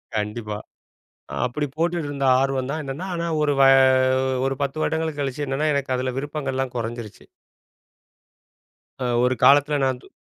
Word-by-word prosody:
கண்டிப்பா. 105 0 -3 0.9
அப்படி 145 +4 -2
போட்டுட்டு 165 -2 -1
இருந்த, 140 -1 -3 0.2
ஆர்வம் 135 -1 -1
தான், 155 +1 -3
என்னன்னா. 140 +8 -5
ஆனா, 170 0 -2 0.2
ஒரு 145 -1 +2
வ - - +7 0.8
ஒரு 135 - 0
10 140 +3 -2
வருடங்கள் 160 -2 -1
கழிச்சு 140 +1 -2
என்னன்னா, 140 +3 0
எனக்கு 135 -2 -1
அதில 130 0 -2
விருப்பங்கள்லாம் 135 -3 -3
கொறஞ்சிருச்சு. 115 -2 -6 1.8
அ - - -1 0.2
ஒரு 125 0 +2
காலத்தில 145 +1 +5
நான் 130 -1 -1
து - - -15
135 Hz, 140 wpm, -23 LUFS, 130-150 Hz, 1.8 s, வ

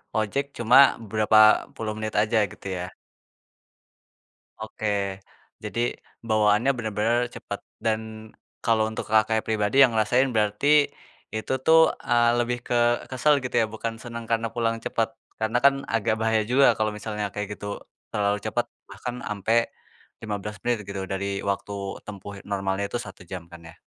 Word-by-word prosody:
ojek 110 +6 0
cuma 120 +2 +5 0.3
berapa 110 0 +3 0.4
puluh 110 -1 -3
menit 110 0 -4
aja 110 +1 0
gitu - - -10
ya? 90 - -3 1.8
Oke 110 0 -6 0.8
jadi 115 - -3 0.5
bawaannya 110 +4 +3
bener-bener 110 +1 0 0.2
cepet - - -6 0.2
dan, 110 -1 +1 0.6
kalau 110 -1 +3
untuk 110 - -5
Kakaknya 110 +1 +3
pribadi 110 +2 0
yang 130 -4 +7
ngerasain 125 +5 +3
berarti, 105 +6 +1 0.7
itu 110 +4 -3
tuh, 160 0 +7 0.2
eee, 120 0 +4
lebih 120 0 0
ke - - -1 0.4
kesel 135 +3 +3
gitu 125 - -5
ya 110 - +2
bukan 115 0 -4
senang 115 -1 -7
karena 115 0 +1
pulang 115 -1 0
cepet, 115 -1 0 0.3
karena 110 +2 +1
kan 140 0 +7 0.2
agak 115 0 +2
bahaya 110 -1 +2
juga 135 +2 +5
kalau 110 0 0
misalnya 105 0 -4
kayak 105 -1 -4
gitu 100 - -8 0.5
terlalu 105 0 +1
cepet 110 +2 -1 0.2
bahkan 125 0 -6
ampe 105 +1 -1 0.7
15 105 -1 -4
menit 120 -1 +1
gitu 100 -1 -4
dari 100 0 -2
waktu 100 +1 -3 0.3
tempuh 100 -1 -8 0.2
normalnya 95 0 -1
itu 120 - -3
1 100 - -11
jam 95 -2 -5
kan 85 - -10
ya. - - -13
110 Hz, 150 wpm, -25 LUFS, 105-120 Hz, 1.8 s, yang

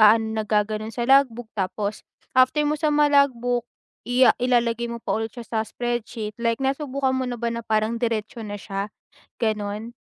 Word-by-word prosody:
aano 220 +1 +6
nagga-ganon 215 0 0
sa 240 - 0
logbook 245 -3 +3
tapos, 205 +1 -2 0.3
after 260 +4 +4
mo 295 - +1
sa 310 - +2
malogbook, 280 -5 +3 0.4
i 250 +1 +5
a - - +7
ilalagay 235 -1 +1
mo 235 - -4
pa 235 - -3
ulit 225 0 -2
siya 240 - -6
sa 220 0 -1
spreadsheet 235 -2 -3
like 230 -1 +1
nasubukan 270 0 0
mo 260 -1 -1
na 245 - -3
ba 235 0 -2
na 235 - -3
parang 220 +1 0
diretso 230 -1 -2
na 205 -1 -5
siya, 195 +1 -4 0.5
ganon? 215 +1 -2
235 Hz, 175 wpm, -24 LUFS, 215-255 Hz, 0.5 s, a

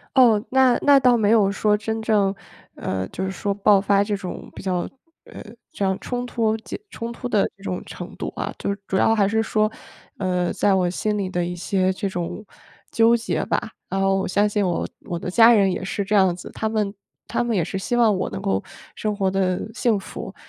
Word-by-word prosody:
哦， 230 -5 +6
那 260 -1 +4
那 285 -1 +7
倒 250 -2 +4
没 210 -2 +2
有 210 -3 +4
说 210 +1 +2
真 220 +1 -3
正 205 -3 +2 0.4
呃， 95 0 -3
就 190 - -4
是 190 - -2
说 200 +1 -2
爆 200 0 +4
发 200 0 +3
这 205 0 -1
种， 185 -2 -7
比 - - -9
较 180 -2 -1 0.4
呃， - - -10 0.3
这 200 - -3
样 190 -1 +1
冲 245 0 -3
突 225 -3 0
结 220 - -8
冲 230 0 -5
突 245 +1 -6
的 210 -4 +3
这 195 - -20
种 185 -2 -4
程 - - -9
度 - - -5
啊， - - -3
就 200 - -1
主 190 - -1
要 225 - +4
还 200 -3 +3
是 220 +1 +1
说， 215 -1 +1 0.5
呃， 180 -2 0
在 200 - +2
我 185 -2 +2
心 210 +4 -1
里 195 -2 -2
的 175 -1 -1
一 175 +1 -4
些 185 +1 0
这 195 +1 -3
种 185 +3 -5 0.5
纠 230 +1 +4
结 230 - -2
吧。 - - -2 0.2
然 195 - -2
后 195 0 +2
我 190 - -1
相 205 +3 +2
信 205 -1 0
我 175 - -1 0.2
我 175 -4 -3
的 180 - -5
家 230 +5 +7
人 200 -4 +4
也 - - -4
是 195 +1 -2
这 210 - -1
样 190 -3 +4
子， 175 - -10
他 220 - -2
们 215 -2 -1 0.3
他 - - -1
们 235 -2 -1
也 175 - +2
是 190 - -4
希 240 +5 -2
望 230 -3 +4
我 185 - -2
能 95 - -5
够 95 0 0 0.3
生 215 -1 -2
活 195 -2 +1
得 190 +2 -1
幸 235 -4 +1
福， 195 - -8
200 Hz, 245 characters per minute, -23 LUFS, 190-220 Hz, 0.5 s, 那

